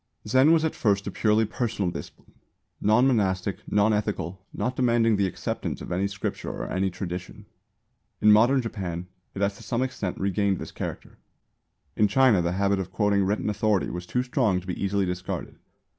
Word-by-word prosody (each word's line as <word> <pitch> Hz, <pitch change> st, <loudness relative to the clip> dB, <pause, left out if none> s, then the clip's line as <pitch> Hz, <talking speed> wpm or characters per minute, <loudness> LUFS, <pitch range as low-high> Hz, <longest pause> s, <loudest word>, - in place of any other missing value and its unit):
Zen 130 Hz, +4 st, +5 dB
was 160 Hz, -1 st, +4 dB
at 160 Hz, -, 0 dB
first 100 Hz, -3 st, +1 dB
a -, -, -3 dB
purely 110 Hz, 0 st, +2 dB
personal 105 Hz, -4 st, -2 dB
discipline, -, -, -10 dB, 0.5 s
non 110 Hz, +5 st, +4 dB
monastic, 100 Hz, -6 st, +1 dB
non 105 Hz, +1 st, +3 dB
ethical, 100 Hz, -3 st, -2 dB
not 125 Hz, +1 st, -2 dB
demanding 115 Hz, -3 st, +3 dB
the 100 Hz, -1 st, +2 dB
acceptance 90 Hz, -, -4 dB
of -, -, -8 dB
any 95 Hz, +3 st, +1 dB
Scripture 100 Hz, 0 st, -4 dB
or -, -, -5 dB
any 95 Hz, +1 st, +1 dB
tradition. 90 Hz, 0 st, -6 dB, 0.7 s
In 105 Hz, -, +6 dB
modern 120 Hz, +5 st, +5 dB
Japan 90 Hz, -6 st, -4 dB, 0.3 s
it 100 Hz, -, -1 dB
has 100 Hz, 0 st, 0 dB
to -, -, -13 dB
some 120 Hz, +1 st, -1 dB
extent 110 Hz, -8 st, -3 dB
regained 100 Hz, 0 st, +1 dB
this -, -, -7 dB
character. -, -, -7 dB, 0.8 s
In 105 Hz, -, +4 dB
China 110 Hz, -2 st, +4 dB
the 85 Hz, +1 st, -1 dB
habit 100 Hz, +1 st, +1 dB
of 95 Hz, -1 st, -4 dB
quoting 100 Hz, -1 st, +2 dB
written 105 Hz, +3 st, -1 dB
authority 105 Hz, -2 st, +1 dB
was 90 Hz, 0 st, -6 dB
too 125 Hz, -, 0 dB
strong 125 Hz, -7 st, +1 dB
to 90 Hz, -, -13 dB
be 90 Hz, +1 st, -4 dB
easily 100 Hz, 0 st, +1 dB
discarded. 90 Hz, 0 st, -5 dB
100 Hz, 180 wpm, -26 LUFS, 95-115 Hz, 0.8 s, In